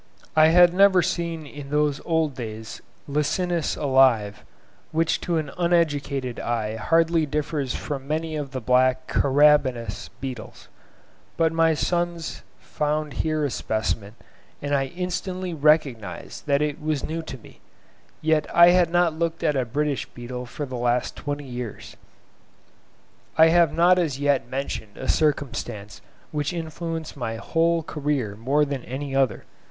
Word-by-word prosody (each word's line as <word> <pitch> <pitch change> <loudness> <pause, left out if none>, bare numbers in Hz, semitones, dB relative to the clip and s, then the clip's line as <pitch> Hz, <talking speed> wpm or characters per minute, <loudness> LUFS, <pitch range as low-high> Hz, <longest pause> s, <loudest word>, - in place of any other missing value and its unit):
I 155 0 +7
had 175 +1 +6
never 190 -1 +5
seen 170 -3 -2
in 145 -1 -9
those 150 -1 +1
old 160 -3 +1
days 110 -3 -7 0.3
Licinus 160 +4 0
alive, 130 -7 +3 0.5
which 165 0 +1
to 170 -2 -1
an 150 -3 -3
uneducated 145 -7 0
eye 110 -2 -2
hardly 165 +4 +2
differs 150 -2 -2
from 140 -3 -5
many 155 +1 -2
of 145 -2 -4
the 130 -1 -5
black 130 +2 +2
Carabidous 135 -6 +2
beetles; 130 -5 -8 0.7
but 165 -1 +2
my 165 -1 +3
sons 170 0 -2 0.2
found 150 -1 -2
here 155 -1 0
a 140 - -2
specimen, 110 -2 -2 0.4
and 145 0 -3
I 135 -1 +2
instantly 180 +2 -4
recognised 135 - 0
that 140 +1 +2
it 150 +1 -3
was 155 -2 -1
new 165 +1 -3
to 145 -4 -8
me; 115 - -17 0.6
yet 155 -1 +2
I 170 +1 +7
had 180 -1 +4
not 175 -1 +2
looked 165 0 -2
at 150 - +2
a 130 -2 +1
British 145 +3 -1
beetle 125 +1 -7
for 145 +4 -5
the 130 -2 -6
last 120 0 0
twenty 145 0 -5
years. 125 -4 -7 1.4
I 160 0 +7
have 170 -2 +4
not 180 +2 +4
as 155 -7 -1
yet 140 -3 +1
mentioned 130 -6 -5
a - - -6
circumstance 120 -8 -1 0.3
which 150 +2 -2
influenced 165 -1 -5
my 115 -5 -4
whole 165 +7 +1
career 145 -9 -2
more 135 +7 +1
than 140 -3 -4
any 135 +2 -5
other. 135 -2 +1
150 Hz, 145 wpm, -24 LUFS, 130-165 Hz, 1.4 s, I